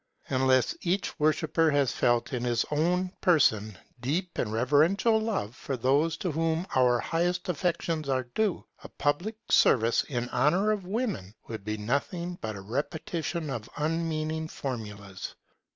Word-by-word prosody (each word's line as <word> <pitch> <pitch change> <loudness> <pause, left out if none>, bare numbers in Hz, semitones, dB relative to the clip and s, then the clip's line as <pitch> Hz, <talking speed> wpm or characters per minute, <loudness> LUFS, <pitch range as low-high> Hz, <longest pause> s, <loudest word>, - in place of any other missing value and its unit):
Unless 130 -1 +3
each 185 +1 -1
worshipper 155 +1 +2
has 145 -4 +2
felt 120 +2 +1
in 125 -1 -1
his 120 -1 +1
own 180 +5 +1
person 110 - +3 0.2
deep 170 +9 -2
and 105 - -1
reverential 155 - +3
love 210 - -2
for 135 - -4
those 145 +6 +2
to 180 - -2
whom 165 +2 0
our 125 -2 +4
highest 175 +4 -1
affections 165 -3 -1
are 130 -1 +1
due, 190 - -1 0.2
a - - -9
public 160 +10 -1 0.2
service 115 -1 +4
in 125 -3 -2
honour 175 +11 +3
of 200 -4 -2
women 195 - -2
would 110 -3 -6
be 105 +1 -3
nothing 170 - -2
but 110 -1 -4
a 100 - -7
repetition 155 - -3
of 115 -3 -5
unmeaning 160 0 -1
formulas. 105 - -6
150 Hz, 145 wpm, -28 LUFS, 120-170 Hz, 0.2 s, our